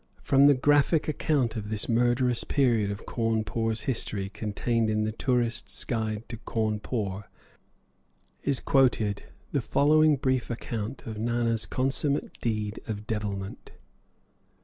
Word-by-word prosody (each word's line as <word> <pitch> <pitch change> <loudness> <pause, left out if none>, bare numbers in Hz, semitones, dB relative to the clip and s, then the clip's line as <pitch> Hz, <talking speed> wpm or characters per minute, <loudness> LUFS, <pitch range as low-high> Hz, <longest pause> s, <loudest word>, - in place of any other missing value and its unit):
From 135 +1 +5
the 145 0 +7
graphic 145 +4 +3
account 140 -6 0
of 105 -2 -5
this 110 -1 -1
murderous 120 +1 +2
period 120 -7 +2
of 100 +1 -6
Cawnpore's 115 -1 -1
history 105 -6 -2
contained 110 +2 -1
in 110 0 +1
the 110 - -1
"Tourists' 120 0 0
Guide 110 -2 -2
to 115 - -6
Cawnpore" 105 -3 -2 1.2
is 140 -3 +1
quoted 115 -7 +2 0.3
the - - +1
following 155 +1 +4
brief 130 -2 0
account 115 +1 -4
of 110 -2 -6
Nana's 115 -1 0
consummate 135 +2 -1
deed 105 -2 -2
of 105 -1 -4
devilment. 105 -3 -4
115 Hz, 125 wpm, -27 LUFS, 110-130 Hz, 1.2 s, the